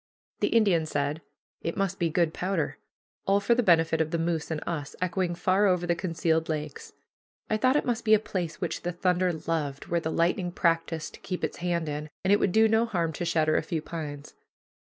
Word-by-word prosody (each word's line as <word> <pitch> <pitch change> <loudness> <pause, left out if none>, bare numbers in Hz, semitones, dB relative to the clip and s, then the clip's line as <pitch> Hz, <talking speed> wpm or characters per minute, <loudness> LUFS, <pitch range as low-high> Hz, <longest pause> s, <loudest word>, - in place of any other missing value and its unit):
The - - +2
Indian 195 -8 +3
said, 145 +1 -1 0.4
"It 165 - -3
must 195 -1 -1
be 170 -2 +1
good 165 0 +1
powder." 180 -4 -2 0.5
All 200 +1 +4
for 205 +4 +3
the 245 - +3
benefit 165 -5 +3
of 160 - 0
the 170 - -1
moose 165 -1 -1
and 160 -2 -2
us, 150 -4 -4
echoing 180 -1 -1
far 190 +4 +3
over 180 -2 +2
the 175 - +2
concealed 165 -2 0
lakes. 150 -2 -4 0.6
I 215 - +3
thought 255 +5 +3
it 295 - +2
must 240 -2 -1
be 220 -1 +6
a - - +2
place 175 -6 -4
which - - -3
the 175 0 -3
thunder 180 +1 +1
loved, 155 -4 -3
where 170 - +2
the 160 - -3
lightning 175 +2 +1
practiced 165 -2 0
to - - -12
keep 180 -3 -5
its 155 - -2
hand 170 -2 -1
in, 150 +1 -4
and 190 +2 +4
it 205 - +4
would 195 - +2
do 220 +3 +5
no 220 +1 +3
harm 170 -7 -1
to 175 - -3
shatter 155 -2 +2
a - - +2
few 160 0 -3
pines. 150 -4 -6
170 Hz, 220 wpm, -27 LUFS, 160-190 Hz, 0.6 s, be